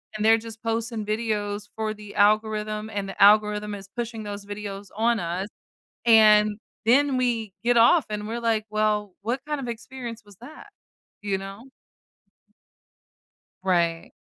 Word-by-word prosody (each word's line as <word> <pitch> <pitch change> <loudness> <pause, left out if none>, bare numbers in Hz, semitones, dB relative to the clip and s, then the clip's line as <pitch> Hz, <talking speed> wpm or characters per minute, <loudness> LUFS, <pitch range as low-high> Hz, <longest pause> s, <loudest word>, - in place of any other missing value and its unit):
and 215 0 -2
they're 225 +1 +6
just 225 0 -11
posting 225 -1 -2
videos 210 -1 -2
for 220 -1 -2
the 210 -1 -12
algorithm, 215 +1 +1
and 200 -2 -3
the - - -7
algorithm 210 0 +4
is 195 -1 -10
pushing 230 -2 -4
those 205 -1 -6
videos 205 -1 -7
on 230 +1 +2
us, 175 +3 -3 0.6
and 215 -2 +6 0.3
then 275 +3 +4
we 230 -5 -1
get 240 0 +3
off, 250 +7 +6
and 210 0 -4
we're 230 +2 -3
like, 225 -2 0
"Well, 210 -2 0
what 240 +5 -2
kind 295 -1 -2
of 255 - -5
experience 235 -1 -7
was 205 -3 -17
that?" 305 - -13 0.5
You 200 -2 -1
know? 195 +6 -9 1.9
Right. 170 -3 0
215 Hz, 145 wpm, -25 LUFS, 205-230 Hz, 1.9 s, they're